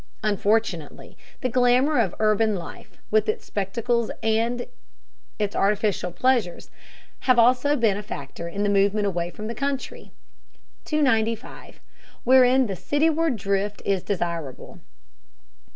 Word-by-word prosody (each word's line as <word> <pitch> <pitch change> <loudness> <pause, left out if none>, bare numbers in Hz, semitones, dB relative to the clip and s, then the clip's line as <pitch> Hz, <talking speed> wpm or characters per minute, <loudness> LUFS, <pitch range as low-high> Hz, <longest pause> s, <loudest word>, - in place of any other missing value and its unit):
Unfortunately, 205 -5 -1 0.3
the 255 - 0
glamour 250 +4 +3
of 205 -6 0
urban 215 0 +2
life, 170 -3 -9
with 215 0 +2
its 215 - -2
spectacles 230 +4 -1
and 230 +2 0 0.7
its 205 -1 -2
artificial 200 -3 0
pleasures, 240 -4 0 0.5
has 255 -2 +3
also 250 +5 +4
been 225 -7 +2
a - - -4
factor 150 -4 -7
in 200 +4 -3
the 205 - +1
movement 205 +1 +2
away 175 -3 -1
from 210 +4 -8
the 230 - -4
country. 275 +2 -4 0.7
295. 230 -6 -1 0.4
WHEREIN 260 +1 +5
THE 195 -4 -4
CITYWARD 315 - +1
DRIFT 200 0 -2
IS 195 -2 +1
DESIRABLE. 170 -8 -4
215 Hz, 120 wpm, -24 LUFS, 195-245 Hz, 0.7 s, WHEREIN